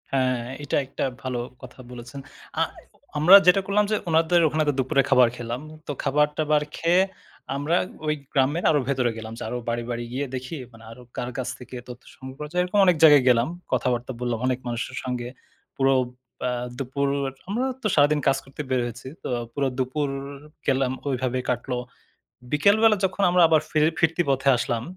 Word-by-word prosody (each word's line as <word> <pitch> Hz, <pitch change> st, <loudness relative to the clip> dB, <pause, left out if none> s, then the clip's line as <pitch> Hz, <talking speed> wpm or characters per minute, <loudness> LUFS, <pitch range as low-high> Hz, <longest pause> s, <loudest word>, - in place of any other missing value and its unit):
হ্যাঁ, 130 Hz, -2 st, +1 dB, 0.2 s
এটা 145 Hz, -, -2 dB
একটা 135 Hz, -, -5 dB, 0.2 s
ভালো 130 Hz, -2 st, -2 dB, 0.2 s
কথা 130 Hz, 0 st, -12 dB
বলেছেন। 120 Hz, +2 st, -9 dB, 0.4 s
অ্যা -, -, +2 dB, 0.5 s
আমরা 165 Hz, +6 st, +8 dB
যেটা 180 Hz, +2 st, +6 dB
করলাম 205 Hz, +2 st, +2 dB
যে -, -, +3 dB
উনাদের 165 Hz, +2 st, +4 dB
ওখানে 155 Hz, +1 st, +1 dB
তো -, -, +2 dB
দুপুরে 135 Hz, +2 st, +3 dB
খাবার 125 Hz, -2 st, +6 dB
খেলাম। 120 Hz, +2 st, -4 dB, 0.3 s
তো -, -, -2 dB
খাবার-টাবার 150 Hz, +1 st, +2 dB
খেয়ে 175 Hz, +2 st, +3 dB, 0.5 s
আমরা 145 Hz, +5 st, 0 dB, 0.3 s
ওই 150 Hz, -, +3 dB, 0.2 s
গ্রামের 145 Hz, +5 st, +2 dB
আরো 150 Hz, -, +3 dB
ভেতরে 130 Hz, -3 st, +1 dB
গেলাম। 110 Hz, 0 st, -7 dB
যে -, -, -6 dB
আরো 125 Hz, -, -3 dB
বাড়ি, 120 Hz, 0 st, -1 dB
বাড়ি 120 Hz, 0 st, -3 dB
গিয়ে 140 Hz, +3 st, -1 dB
দেখি 130 Hz, +5 st, -5 dB, 0.4 s
আরো 120 Hz, +2 st, -12 dB, 0.2 s
কার 125 Hz, -, -3 dB
কাছ 130 Hz, -2 st, -2 dB
থেকে 125 Hz, 0 st, -10 dB
তথ্য 125 Hz, 0 st, -9 dB
সংগ্রহ 130 Hz, 0 st, -10 dB
করা 150 Hz, 0 st, -6 dB
যায়। 180 Hz, +1 st, +1 dB
এরকম 180 Hz, +3 st, -2 dB
তো -, -, +7 dB
অনেক 180 Hz, -3 st, +4 dB
জায়গায় 145 Hz, -4 st, +8 dB
গেলাম। 120 Hz, -1 st, +4 dB, 0.2 s
কথাবার্তা 125 Hz, -1 st, 0 dB
বললাম 120 Hz, -2 st, -1 dB
অনেক 130 Hz, -1 st, 0 dB
মানুষের 120 Hz, 0 st, -4 dB
সঙ্গে। 125 Hz, -1 st, -3 dB, 0.5 s
পুরো 135 Hz, 0 st, +3 dB, 0.5 s
অ্যা 125 Hz, -, 0 dB, 0.3 s
দুপুর 140 Hz, +1 st, -2 dB, 0.4 s
আমরা 235 Hz, +6 st, 0 dB, 0.2 s
তো -, -, 0 dB
সারাদিন 150 Hz, 0 st, +4 dB
কাজ 135 Hz, -1 st, +4 dB
করতে 135 Hz, +2 st, -8 dB
বের 130 Hz, -1 st, +1 dB
হয়েছি। 120 Hz, +2 st, -7 dB, 0.2 s
তো -, -, -4 dB, 0.2 s
পুরো 140 Hz, -1 st, 0 dB
দুপুর 135 Hz, +3 st, -1 dB, 0.6 s
গেলাম 135 Hz, -1 st, +2 dB, 0.2 s
ওইভাবে 130 Hz, -1 st, -1 dB
কাটল। 125 Hz, +1 st, -2 dB, 0.8 s
বিকেলবেলা 215 Hz, +8 st, +5 dB
যখন 190 Hz, +1 st, -2 dB
আমরা 180 Hz, 0 st, +4 dB
আবার 160 Hz, -2 st, +4 dB
ফির 155 Hz, -1 st, +2 dB, 0.2 s
ফিরতি 165 Hz, +2 st, +2 dB
পথে 135 Hz, 0 st, +2 dB
আসলাম, 115 Hz, -1 st, -2 dB
135 Hz, 180 wpm, -24 LUFS, 125-155 Hz, 0.8 s, আমরা